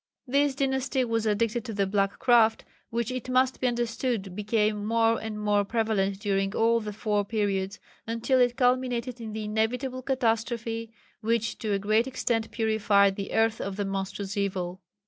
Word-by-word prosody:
This 280 Hz, +1 st, +2 dB
dynasty 265 Hz, -1 st, 0 dB
was 225 Hz, -1 st, 0 dB
addicted 225 Hz, +2 st, 0 dB
to 225 Hz, -, -5 dB
the 200 Hz, -1 st, +1 dB
black 195 Hz, 0 st, 0 dB
craft, 230 Hz, -3 st, +4 dB, 0.2 s
which 235 Hz, +1 st, -2 dB
it 255 Hz, 0 st, -5 dB
must 255 Hz, +1 st, +2 dB
be 255 Hz, -, +2 dB
understood 235 Hz, -4 st, -2 dB
became 210 Hz, 0 st, 0 dB
more 225 Hz, +1 st, +2 dB
and 220 Hz, -1 st, -5 dB
more 205 Hz, -1 st, +2 dB
prevalent 200 Hz, -3 st, 0 dB
during 195 Hz, -1 st, 0 dB
all 230 Hz, +1 st, +3 dB
the 215 Hz, -2 st, -5 dB
four 210 Hz, -1 st, 0 dB
periods, 200 Hz, -2 st, -1 dB, 0.3 s
until 230 Hz, +3 st, +1 dB
it 245 Hz, 0 st, +2 dB
culminated 250 Hz, -1 st, +1 dB
in 220 Hz, -2 st, -6 dB
the 220 Hz, 0 st, -4 dB
inevitable 240 Hz, +5 st, -1 dB
catastrophe, 230 Hz, -3 st, -1 dB, 0.3 s
which 230 Hz, 0 st, -1 dB
to 215 Hz, -2 st, -1 dB
a -, -, +2 dB
great 215 Hz, +4 st, +2 dB
extent 235 Hz, -3 st, -1 dB
purified 210 Hz, -3 st, +3 dB
the 200 Hz, 0 st, -5 dB
earth 225 Hz, 0 st, +2 dB
of 195 Hz, 0 st, -4 dB
the 205 Hz, 0 st, -2 dB
monstrous 195 Hz, 0 st, -4 dB
evil. 190 Hz, -2 st, -2 dB
225 Hz, 165 wpm, -27 LUFS, 205-240 Hz, 0.3 s, craft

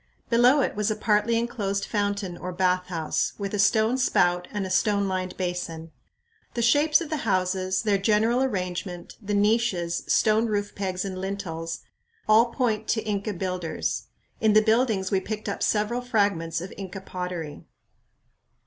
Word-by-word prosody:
Below 245 Hz, +5 st, +5 dB
it -, -, -1 dB
was 210 Hz, 0 st, 0 dB
a 215 Hz, -, 0 dB
partly 215 Hz, +2 st, +2 dB
enclosed 200 Hz, -4 st, -1 dB
fountain 200 Hz, -3 st, -2 dB
or 180 Hz, +1 st, -6 dB
bathhouse, 180 Hz, -3 st, 0 dB
with 200 Hz, -1 st, -4 dB
a 205 Hz, -, -1 dB
stone 220 Hz, +5 st, +3 dB
spout 180 Hz, -7 st, +2 dB
and 205 Hz, -2 st, -3 dB
a 185 Hz, -, -5 dB
stone 200 Hz, +1 st, +2 dB
lined 185 Hz, -1 st, -3 dB
basin. 175 Hz, -3 st, -4 dB, 0.6 s
The 235 Hz, -, 0 dB
shapes 295 Hz, +7 st, +4 dB
of 320 Hz, -2 st, -6 dB
the 310 Hz, -, 0 dB
houses, 185 Hz, -4 st, 0 dB
their 205 Hz, -3 st, +2 dB
general 220 Hz, +4 st, +2 dB
arrangement, 180 Hz, -6 st, -3 dB
the 205 Hz, 0 st, -2 dB
niches, 205 Hz, -5 st, +1 dB
stone 220 Hz, +1 st, +3 dB
roof 205 Hz, -1 st, -2 dB
pegs 185 Hz, -1 st, -3 dB
and 185 Hz, -1 st, -5 dB
lintels, 170 Hz, -4 st, -4 dB, 0.5 s
all 215 Hz, +2 st, +6 dB
point 235 Hz, -3 st, -1 dB
to 220 Hz, -, 0 dB
Inca 210 Hz, 0 st, -2 dB
builders. 180 Hz, -2 st, -3 dB, 0.3 s
In 220 Hz, -1 st, +3 dB
the 215 Hz, +1 st, +6 dB
buildings 220 Hz, -4 st, +2 dB
we 195 Hz, -, +3 dB
picked 215 Hz, +3 st, -5 dB
up 200 Hz, -, -3 dB
several 215 Hz, +3 st, +1 dB
fragments 200 Hz, -9 st, 0 dB
of 185 Hz, -, -7 dB
Inca 195 Hz, -1 st, -7 dB
pottery. 180 Hz, -5 st, -6 dB
200 Hz, 160 wpm, -26 LUFS, 185-220 Hz, 0.6 s, all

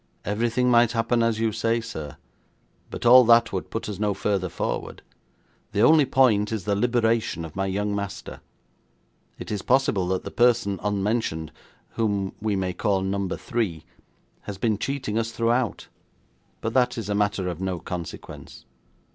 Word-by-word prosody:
'Everything 115 Hz, +5 st, 0 dB
might 120 Hz, -2 st, +4 dB
happen 115 Hz, +1 st, +1 dB
as 115 Hz, -1 st, +1 dB
you 115 Hz, -1 st, +1 dB
say, 115 Hz, +2 st, 0 dB
sir, 80 Hz, -11 st, -7 dB, 0.7 s
but -, -, -7 dB
all 125 Hz, +2 st, +9 dB
that 115 Hz, -1 st, +5 dB
would 95 Hz, -, -3 dB
put 115 Hz, 0 st, -4 dB
us 100 Hz, -3 st, -5 dB
no 105 Hz, -2 st, 0 dB
further 95 Hz, -3 st, -1 dB
forward. -, -, -4 dB, 0.7 s
The 100 Hz, -, +1 dB
only 155 Hz, +1 st, +6 dB
point 115 Hz, -6 st, +3 dB
is 110 Hz, -4 st, -3 dB
the 100 Hz, +1 st, 0 dB
liberation 115 Hz, -6 st, +1 dB
of 80 Hz, -, -11 dB
my 95 Hz, 0 st, -1 dB
young 100 Hz, +2 st, -1 dB
master. 100 Hz, -1 st, -6 dB, 1.0 s
It -, -, -8 dB
is 105 Hz, -2 st, -2 dB
possible 130 Hz, -8 st, +2 dB
that 95 Hz, 0 st, -1 dB
the -, -, -7 dB
person 115 Hz, -5 st, +2 dB
unmentioned, 100 Hz, -6 st, -1 dB, 0.4 s
whom 100 Hz, -4 st, -1 dB
we 105 Hz, -1 st, 0 dB
may 95 Hz, -1 st, -1 dB
call 100 Hz, +1 st, 0 dB
Number 95 Hz, -1 st, -2 dB
Three, 110 Hz, -, -3 dB, 0.6 s
has 100 Hz, -, -5 dB
been 110 Hz, 0 st, 0 dB
cheating 130 Hz, -5 st, -2 dB
us 115 Hz, 0 st, -1 dB
throughout, 115 Hz, +1 st, 0 dB, 0.7 s
but 115 Hz, -, -3 dB
that 125 Hz, -2 st, +2 dB
is 110 Hz, -4 st, -4 dB
a 105 Hz, -, -1 dB
matter 100 Hz, -2 st, 0 dB
of 90 Hz, -1 st, -4 dB
no 95 Hz, -1 st, -2 dB
consequence.' 85 Hz, -2 st, -8 dB
105 Hz, 165 wpm, -25 LUFS, 95-115 Hz, 1.0 s, all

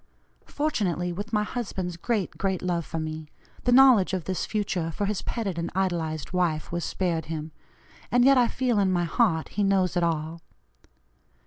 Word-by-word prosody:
"Fortunately, 190 Hz, -, -1 dB
with 205 Hz, +4 st, -6 dB
my 210 Hz, -2 st, +2 dB
husband's 195 Hz, -6 st, -4 dB
great, 205 Hz, +2 st, -1 dB
great 190 Hz, -2 st, -2 dB
love 175 Hz, -3 st, -1 dB
for -, -, -4 dB
me 155 Hz, -1 st, -5 dB, 0.4 s
the 245 Hz, -, +3 dB
knowledge 245 Hz, -7 st, +6 dB
of 180 Hz, -, -3 dB
this 185 Hz, +2 st, -3 dB
future 195 Hz, -6 st, -1 dB
for 200 Hz, +5 st, -2 dB
his 205 Hz, -1 st, -2 dB
petted 200 Hz, -7 st, -3 dB
and 170 Hz, -, -2 dB
idolized 170 Hz, -5 st, -2 dB
wife 170 Hz, -4 st, 0 dB
was 170 Hz, -1 st, -2 dB
spared 170 Hz, -4 st, -1 dB
him, 155 Hz, 0 st, -5 dB, 0.6 s
and 245 Hz, 0 st, +4 dB
yet 275 Hz, 0 st, +7 dB
I 245 Hz, -2 st, +4 dB
feel 245 Hz, -3 st, 0 dB
in 195 Hz, -2 st, +2 dB
my 175 Hz, -1 st, +1 dB
heart 170 Hz, -3 st, +1 dB
he 205 Hz, -, -1 dB
knows 190 Hz, -2 st, +2 dB
it 175 Hz, -, +2 dB
all. 165 Hz, 0 st, -1 dB
185 Hz, 180 wpm, -26 LUFS, 165-210 Hz, 0.6 s, yet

